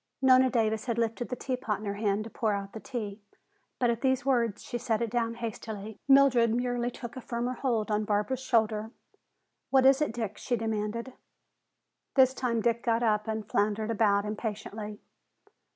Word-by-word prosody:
Nona 260 -1 +6
Davis 220 -3 0
had 235 -2 -1
lifted 230 +1 -1
the 250 - -2
teapot 250 -5 -2
in 215 - -9
her 200 - -2
hand 205 0 0
to 225 - -9
pour 220 -3 0
out 200 0 -4
the 220 - -6
tea, 220 -5 -5 0.6
but 245 -2 +2
at 230 0 -3
these 260 -1 +1
words 235 -6 +1
she 240 - -4
set 225 -2 0
it 230 -2 -2
down 230 -1 0
hastily. 220 -2 -6
Mildred 260 -5 +5
merely 245 0 0
took 240 +1 -8
a 260 - -6
firmer 240 +1 -2
hold 230 -4 -1
on 210 0 +1
Barbara's 210 +5 0
shoulder. 220 -4 +1 0.8
"What 265 -1 +4
is 270 +2 +6
it, 300 - +1
Dick?" 220 -3 -4
she 245 - -1
demanded. 225 +2 -3 1.0
This 260 -1 +6
time 240 -3 -1
Dick 235 +1 +1
got 230 0 +1
up 215 -1 +1
and 220 -1 -3
floundered 215 +2 0
about 205 -2 +2
impatiently. 210 0 -5
230 Hz, 180 wpm, -29 LUFS, 215-245 Hz, 1.0 s, Nona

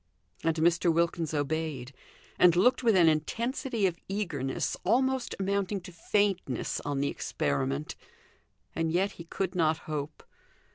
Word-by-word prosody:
And 165 -1 +2
Mr. 170 +1 +3
Wilkins 165 -1 0
obeyed, 145 -3 -2 0.5
and 175 -2 +6
looked 245 +10 +4
with 230 -4 +4
an 175 -3 +6
intensity 230 - 0
of 175 -2 0
eagerness 165 -10 -2
almost 260 +5 +1
amounting 200 +1 0
to 180 - -10
faintness 185 - 0
on 145 -1 -2
the 140 - +1
experiment, 70 0 -2 0.8
and 165 -1 0
yet 190 +4 +1
he 170 - -11
could 185 +2 -3
not 160 -3 +2
hope. 150 -1 -5
170 Hz, 135 wpm, -29 LUFS, 155-195 Hz, 0.8 s, and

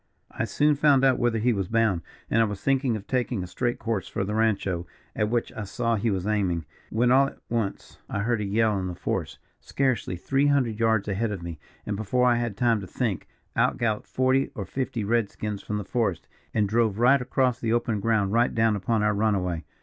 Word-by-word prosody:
"I - - -2
soon 150 +1 +2
found 140 -2 +4
out 130 -2 +3
whither 120 -2 +1
he 120 +2 +2
was 95 -3 -2
bound, 110 -6 +2 0.3
and 115 - +2
I - - +4
was 105 -2 -4
thinking 135 -3 +2
of 105 -2 -6
taking 125 -6 -1
a - - -4
straight 120 +7 -2
course 110 -4 -2
for - - -2
the 100 +2 -3
rancho, 100 -6 0 0.3
at 105 - 0
which 120 0 -1
I 105 - -5
saw 115 +3 -1
he 110 +2 0
was 95 -3 -1
aiming, 95 -6 0 0.2
when 120 +2 +2
all 135 +2 +5
at - - -10
once 115 -4 -3
I 100 - -2
heard 115 0 0
a - - -1
yell 105 0 +1
in 95 - -3
the 90 - -5
forest, - - -3 0.2
scarcely 130 -9 -1
three 135 +10 +1
hundred 125 -7 +1
yards 110 -3 +2
ahead 105 +2 -1
of 95 -4 -5
me, 85 -3 -6 0.3
and 105 - -2
before 110 +5 +1
I 120 -1 +4
had 120 -4 -2
time 115 -3 +2
to 95 - -7
think, 110 -2 -2 0.3
out - - +2
galloped 110 -3 -1
forty 130 +1 +1
or 100 - -4
fifty 130 -3 -3
red 115 0 +1
skins 105 -2 -5
from 105 - -3
the 105 - -4
forest, 110 -9 -1 0.2
and 105 -2 +1
drove 110 -1 +1
right 125 +3 +5
across 125 -1 +1
the 115 - -1
open 115 -2 +1
ground 105 -2 +1
right 120 +1 +2
down 110 -1 +3
upon 105 +2 0
our 105 0 +3
runaway. 95 -6 0
110 Hz, 225 wpm, -26 LUFS, 100-120 Hz, 0.3 s, all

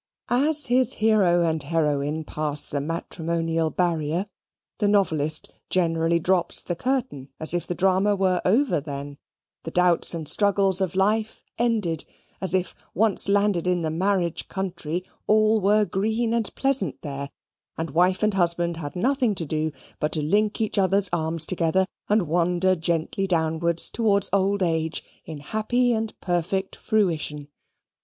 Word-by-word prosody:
As 290 +5 +2
his 250 +1 +2
hero 200 -6 +3
and 160 -2 0
heroine 150 0 -1
pass 150 -1 -4
the 145 - -2
matrimonial 165 +1 -2
barrier, 170 +1 -1 0.5
the 210 - +2
novelist 155 -7 0 0.2
generally 165 -2 +1
drops 175 +1 0
the 175 - -3
curtain, 175 - -2
as 160 +1 +2
if 175 - -2
the 175 - -3
drama 190 +3 +2
were 185 -2 +1
over 230 - +2
then: 140 -1 -7 0.4
the - - -5
doubts 180 0 +2
and 160 -2 -5
struggles 195 -1 +2
of 185 -1 -1
life 215 +3 0 0.2
ended: 210 -10 0 0.4
as 190 -1 0
if, 185 -1 -1 0.2
once 205 0 +3
landed 200 -3 +2
in 180 -2 +1
the 160 - -1
marriage 180 0 0
country, 180 -2 -4 0.2
all 215 0 +4
were 210 +2 +3
green 220 +4 -1
and 230 -3 -1
pleasant 270 - -1
there: 140 -1 -5 0.5
and 160 -2 -3
wife 180 +6 +2
and 215 -1 +2
husband 170 -2 +1
had 145 -1 -6
nothing 245 +2 +1
to 170 - -3
do 155 +1 -1 0.3
but 150 - -1
to 155 - +1
link 210 +8 +1
each 220 -2 0
other's 195 0 +2
arms 160 -1 0
together, 180 +1 +1 0.2
and 210 -4 +2
wander 175 +3 +2
gently 170 +3 -1
downwards 165 -1 +2
towards 200 -4 +1
old 200 0 +2
age 160 -2 -1 0.2
in 160 - -7
happy 220 - 0
and 220 -1 -3
perfect 190 +2 -1
fruition. 155 -8 -1
180 Hz, 150 wpm, -24 LUFS, 160-205 Hz, 0.5 s, all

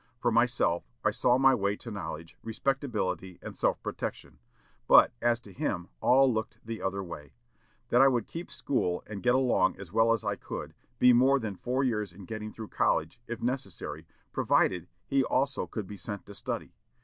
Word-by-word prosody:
For 120 0 +1
myself, 115 - +2 0.2
I - - +4
saw 125 0 +3
my 135 0 +6
way 100 -4 +1
to 115 - -9
knowledge, 80 -4 -6
respectability, 110 - -2
and - - -8
self - - +1
protection; - - -5 0.5
but, - - +7
as 120 -1 +2
to 100 -4 -14
him, 90 -1 -2
all 130 0 +5
looked 110 -1 -3
the 115 0 -5
other 95 0 -2
way; 75 -5 -9 0.6
that 120 - +5
I 135 - +8
would 120 -4 +2
keep 170 +1 -7
school, 90 -10 -1
and 105 -2 -7
get 125 0 +3
along 130 -8 +2
as 100 -2 -10
well 115 +1 +4
as 115 -1 +1
I 100 -1 -1
could, - - -6 0.2
be 125 0 +7
more 130 +3 +5
than 110 -6 -4
four 125 +7 -1
years 105 -6 0
in 95 +2 -12
getting 110 +1 -5
through 110 -1 -8
college, 80 +9 +1
if 120 0 -5
necessary, 125 -7 -4 0.3
provided 90 -1 +2 0.2
he 135 -1 +2
also 135 +2 0
could 110 -4 -5
be 100 +2 -9
sent 100 +1 -6
to 100 - -11
study.... - - -5
115 Hz, 185 wpm, -29 LUFS, 95-125 Hz, 0.6 s, I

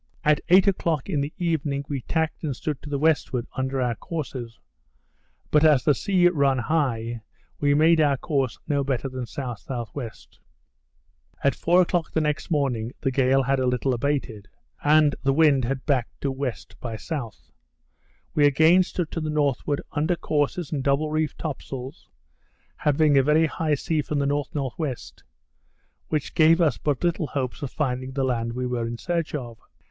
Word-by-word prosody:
At 150 -2 +3
eight 185 +2 +7
o'clock 170 -6 0
in 145 - +1
the 140 +2 -3
evening 155 -5 -1
we 140 -3 -3
tacked 160 +5 -2
and 145 -4 -2
stood 150 +2 -4
to 150 - -9
the 145 - -1
westward, 145 -5 +1
under 130 0 -1
our 125 -2 +1
courses; 125 -4 -6 0.9
but 150 0 +4
as 150 -5 +5
the 150 - +4
sea 180 +5 +3
run 140 -6 +2
high, 120 -4 -1 0.4
we 145 0 +3
made 160 +2 +5
our 145 -2 +3
course 135 -5 -1
no 140 -1 +1
better 135 -1 -1
than 130 -1 -6
S.S.W. 120 -1 -5 1.3
At 140 - +3
four 175 +2 +3
o'clock 175 -1 -2
the - - +2
next 150 -1 -1
morning, 130 -7 0
the 135 - 0
gale 135 +1 +3
had 135 +1 +1
a 130 - +1
little 125 +1 +1
abated; 125 -5 -2 0.4
and 150 0 +5
the 135 -1 +2
wind 145 -5 +4
had 135 +2 -3
backed 130 -6 -1
to 140 - 0
W. 135 -1 -1 0.3
by 115 -2 -5
S. 110 - -12 1.2
We 145 -1 +5
again 160 +6 +5
stood 175 -3 -3
to 165 - -3
the 155 - -2
northward, 145 -1 0
under 155 +4 0
courses 150 +1 -1
and 140 -4 -2
double 140 +3 +1
reefed 155 0 -1
top 155 -5 -4
sails, 130 +3 -8 0.7
having 150 -1 +3
a - - +6
very 150 +4 +3
high 155 -1 0
sea 155 +2 -1
from 150 +1 -3
the 140 - +1
N.N.W., 140 -1 -1 1.4
which 155 -2 -2
gave 165 +1 +5
us 155 -8 +2
but 145 -1 -1
little 170 -3 0
hopes 130 -2 -3
of 140 - -3
finding 130 -2 -2
the 135 0 -1
land 115 -3 -1
we 125 +1 -3
were 120 -2 -2
in 120 0 -5
search 170 +1 -2
of. 120 -5 -6
145 Hz, 175 wpm, -25 LUFS, 130-155 Hz, 1.4 s, eight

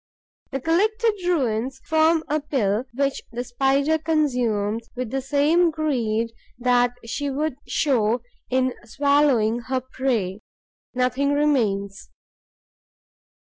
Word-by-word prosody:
The 270 - -3
collected 430 - +2
ruins 260 -5 0
form 320 0 +3
a 300 +2 +1
pill 245 -6 0
which 275 0 0
the 240 +1 -3
Spider 275 +5 +1
consumes 240 -9 0
with 250 -2 -4
the 270 - -1
same 295 +6 +3
greed 235 -8 -1 0.3
that 245 0 +2
she 285 +5 -3
would 285 0 -2
show 240 -5 +1 0.3
in 255 0 +1
swallowing 265 -3 +2
her 255 +2 -2
prey. 235 -7 -2 0.5
Nothing 255 +3 +1
remains. 210 -10 0
260 Hz, 105 wpm, -23 LUFS, 235-295 Hz, 0.5 s, form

